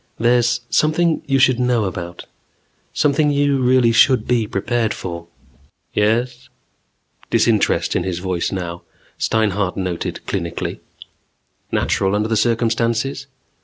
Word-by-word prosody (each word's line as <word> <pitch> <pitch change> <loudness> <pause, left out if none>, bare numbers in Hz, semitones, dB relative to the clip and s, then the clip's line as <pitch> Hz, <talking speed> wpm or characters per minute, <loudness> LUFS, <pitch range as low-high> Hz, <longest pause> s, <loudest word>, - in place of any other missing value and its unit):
"There's 120 0 +2
something 160 +2 +2
you 135 -1 +2
should 130 -2 +3
know 125 -2 +1
about. 85 -2 -6 0.7
Something 150 +1 +2
you 140 -1 +1
really 125 -2 +4
should 130 +2 +4
be 120 -3 +1
prepared 110 +2 -1
for." 85 -2 -7 0.7
"Yes?" 120 +4 0 0.8
Disinterest - - +2
in - - +1
his 90 -2 -3
voice 90 -1 -2
now, 85 -2 -5 0.4
Steinhart 105 -3 0
noted 90 -3 -3
clinically. 85 -4 -4 0.9
Natural 95 +1 +1
under 105 +1 0
the 110 - +1
circumstances? 115 +4 0
115 Hz, 115 wpm, -19 LUFS, 95-130 Hz, 0.9 s, really